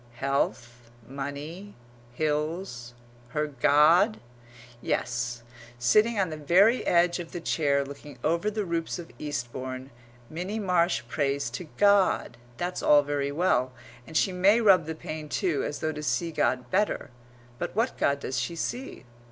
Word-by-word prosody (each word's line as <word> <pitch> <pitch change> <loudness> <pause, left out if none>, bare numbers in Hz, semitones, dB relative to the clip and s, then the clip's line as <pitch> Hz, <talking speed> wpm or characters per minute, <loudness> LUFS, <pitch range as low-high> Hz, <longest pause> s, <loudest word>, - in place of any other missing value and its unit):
Health, 120 -3 -2 0.2
money, 145 +8 -7 0.4
hills, 150 -4 -2 0.3
her 150 +5 -1
God?) 150 - +4 0.6
Yes, 120 0 -2 0.3
sitting 215 - +3
on 185 -4 +1
the 155 - -5
very 190 - +4
edge 175 +1 +3
of 170 -2 -8
the 175 - -4
chair 140 -4 +1
looking 140 -1 -10
over 170 +6 +1
the 210 -1 -3
roofs 170 -1 -2
of 170 -2 -9
Eastbourne, 130 -2 -5 0.4
Minnie 180 - -4
Marsh 180 - +1
prays 140 -1 -1
to 150 +9 -6
God. 200 -10 +3 0.2
That's 175 +1 -3
all 145 -1 +6
very 140 -1 -2
well; 140 -6 +1 0.3
and 160 - -2
she 195 - +2
may 195 +5 +4
rub 190 -8 +5
the 160 - -4
pane 155 -2 -7
too, 160 -4 0
as 145 - -4
though 155 - 0
to 150 - -6
see 165 +3 -1
God 125 -5 0
better; 205 -9 0 0.5
but - - -4
what 230 +4 +1
God 140 0 +1
does 130 -1 -2
she 120 +8 -3
see? 245 - -5
155 Hz, 150 wpm, -27 LUFS, 140-180 Hz, 0.6 s, all